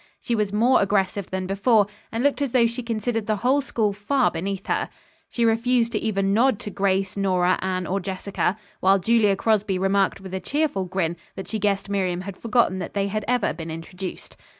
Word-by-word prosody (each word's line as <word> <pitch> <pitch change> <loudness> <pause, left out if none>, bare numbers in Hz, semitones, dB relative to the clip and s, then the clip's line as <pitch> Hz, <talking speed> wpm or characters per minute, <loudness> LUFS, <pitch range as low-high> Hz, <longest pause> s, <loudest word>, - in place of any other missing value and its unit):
She 240 - -3
was 210 -3 0
more 235 +5 +4
aggressive 200 0 0
than 190 0 -3
before, 205 +3 +3 0.3
and 230 +2 -2
looked 285 0 +2
as 275 -4 -1
though 245 -2 +5
she 235 +2 -2
considered 225 -1 -2
the 215 - +2
whole 275 +3 +4
school 220 -6 0
far 245 +7 +1
beneath 195 +3 -4
her. - - -1 0.4
She 235 - 0
refused 230 +1 +2
to - - 0
even 195 -3 0
nod 240 +1 +3
to 205 - -6
Grace, 195 -1 0
Nora, 185 -2 +2
Anne 185 -1 -1
or 195 +3 -1
Jessica, 190 +1 -2 0.2
while 190 +1 +4
Julia 210 +1 +3
Crosby 210 -2 +1
remarked 195 +1 +1
with 190 -1 -10
a 190 - -1
cheerful 275 -3 -1
grin 175 -2 -2 0.2
that 190 - -7
she 220 - -3
guessed 200 -1 0
Miriam 185 -3 -1
had 195 0 -7
forgotten 230 -4 +1
that 180 - -6
they 200 0 0
had 215 +1 -2
ever 245 -3 +1
been 160 0 -7
introduced. 180 +3 -7
200 Hz, 200 wpm, -24 LUFS, 190-230 Hz, 0.4 s, though